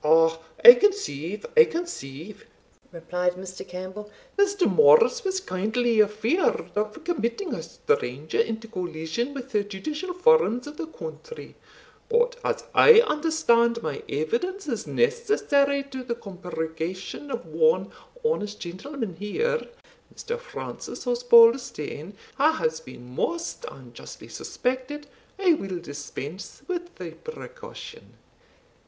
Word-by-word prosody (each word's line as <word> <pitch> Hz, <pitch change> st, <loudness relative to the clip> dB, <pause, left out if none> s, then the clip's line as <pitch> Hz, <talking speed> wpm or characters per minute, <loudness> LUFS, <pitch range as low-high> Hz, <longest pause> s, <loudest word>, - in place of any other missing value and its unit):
"Ah! 165 Hz, +1 st, +5 dB, 0.3 s
I 240 Hz, -, +15 dB
conceive 215 Hz, -, -1 dB
I 470 Hz, 0 st, +9 dB
conceive," 205 Hz, -, -7 dB, 0.4 s
replied 180 Hz, +1 st, -2 dB
Mr. 185 Hz, 0 st, -9 dB
Campbell; 185 Hz, +3 st, -7 dB, 0.3 s
"Mr. 400 Hz, -2 st, +2 dB
Morris 470 Hz, +1 st, +5 dB
was 380 Hz, 0 st, -1 dB
kindly 225 Hz, -, 0 dB
afeared 215 Hz, -, 0 dB
of 210 Hz, +7 st, -2 dB
committing 340 Hz, -, -2 dB
a -, -, -3 dB
stranger 150 Hz, -, -2 dB
into 225 Hz, 0 st, -1 dB
collision 180 Hz, -, -4 dB
wi' 275 Hz, -, -3 dB
the 235 Hz, -5 st, -1 dB
judicial 300 Hz, -, -5 dB
forms 360 Hz, -, +4 dB
of 295 Hz, +1 st, -9 dB
the 325 Hz, -, -4 dB
country; 475 Hz, +7 st, -9 dB, 0.6 s
but 480 Hz, +2 st, +2 dB
as -, -, -1 dB
I 465 Hz, -1 st, +9 dB
understand 300 Hz, -, +2 dB
my 155 Hz, -3 st, -3 dB
evidence 275 Hz, -, -2 dB
is 235 Hz, -6 st, -3 dB
necessary 420 Hz, -13 st, +2 dB
to 260 Hz, -1 st, -5 dB
the 240 Hz, -1 st, -3 dB
compurgation 180 Hz, -, -6 dB
of -, -, -4 dB
one 475 Hz, 0 st, +2 dB, 0.3 s
honest 210 Hz, -, -1 dB
gentleman 190 Hz, -, -6 dB
here, 470 Hz, -, -1 dB, 0.5 s
Mr. 475 Hz, +1 st, -4 dB
Francis -, -, -8 dB
Osbaldistone, 235 Hz, -, +4 dB, 0.3 s
wha 310 Hz, +3 st, +5 dB
has 160 Hz, -, -1 dB
been 125 Hz, -4 st, -12 dB
most 340 Hz, -, -3 dB
unjustly -, -, -12 dB
suspected, 260 Hz, +4 st, -3 dB, 0.3 s
I 380 Hz, -3 st, +4 dB
will 195 Hz, -, -3 dB
dispense 145 Hz, +2 st, -8 dB
with 350 Hz, -1 st, -4 dB
the -, -, -7 dB
precaution. 470 Hz, 0 st, -10 dB
240 Hz, 120 wpm, -25 LUFS, -, 0.6 s, I